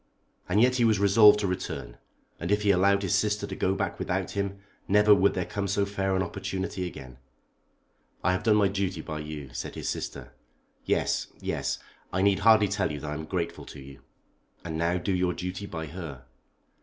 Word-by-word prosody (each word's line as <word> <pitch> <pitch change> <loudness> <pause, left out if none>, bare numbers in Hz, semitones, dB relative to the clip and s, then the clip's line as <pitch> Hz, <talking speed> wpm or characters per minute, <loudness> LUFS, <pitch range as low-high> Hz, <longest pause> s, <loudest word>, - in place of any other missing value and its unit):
And 95 +4 +3
yet 125 +2 +4
he 120 - +3
was 110 -2 +4
resolved 105 +2 +7
to 100 - 0
return, 70 -9 -5 0.4
and 85 +3 -3
if 105 0 +2
he 100 - +5
allowed 100 +2 +3
his 95 - 0
sister 105 -1 +1
to - - -6
go 95 +1 0
back - - -3
without - - -2
him 100 0 -2 0.3
never 105 +1 +6
would 100 0 +3
there 90 - -1
come 100 -1 -3
so 100 +1 +1
fair 95 -1 -1
an 95 - +1
opportunity 95 0 -4
again. 65 -6 -10 1.0
"I 95 - +3
have 90 - 0
done 110 -2 +3
my 105 -2 +4
duty 95 -3 -2
by 75 0 -5
you," 75 -3 -7
said - - -5
his - - -3
sister. 65 -3 -5 0.5
"Yes, - - 0
yes. - - -2 0.3
I 95 +1 0
need 100 -1 +3
hardly 110 -1 +6
tell 100 -4 -1
you 75 - -5
that 75 - -5
I - - -2
am 80 +1 -5
grateful 85 0 -3
to - - -10
you." 70 0 -12 0.6
"And 80 -2 -4
now 85 +2 +1
do 95 +2 -1
your 90 -1 +1
duty 90 +3 -5
by 80 -3 -5
her." 75 -6 -8
95 Hz, 205 wpm, -27 LUFS, 85-100 Hz, 1.0 s, resolved